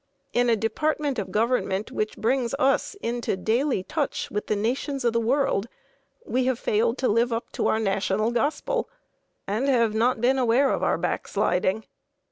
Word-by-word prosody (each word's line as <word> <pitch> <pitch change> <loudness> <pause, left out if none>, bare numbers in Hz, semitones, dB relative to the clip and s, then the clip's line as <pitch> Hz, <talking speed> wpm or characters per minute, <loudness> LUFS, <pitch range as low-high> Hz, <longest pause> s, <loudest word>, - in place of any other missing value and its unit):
In 245 0 +2
a 230 - +4
department 285 +4 -1
of 195 -2 -4
government 215 -2 0
which 215 0 -2
brings 245 +2 0
us 275 +9 +1
into 235 -4 -1
daily 230 +2 0
touch - - -3
with 210 - -3
the 215 - +1
nations 255 +5 -2
of 235 - +2
the 230 - +2
world, 235 -3 +1 0.6
we 255 0 0
have 260 -2 +1
failed 230 +2 +1
to 255 - 0
live 235 +3 +2
up 230 0 -3
to - - -1
our 220 - +2
national 195 +1 0
gospel 315 - -1 0.6
and 220 +7 -1
have 235 -5 +3
not 235 +2 +2
been 260 +3 +2
aware 255 +3 +3
of - - -1
our - - +1
backsliding. 185 +4 0
235 Hz, 170 wpm, -25 LUFS, 215-260 Hz, 0.6 s, a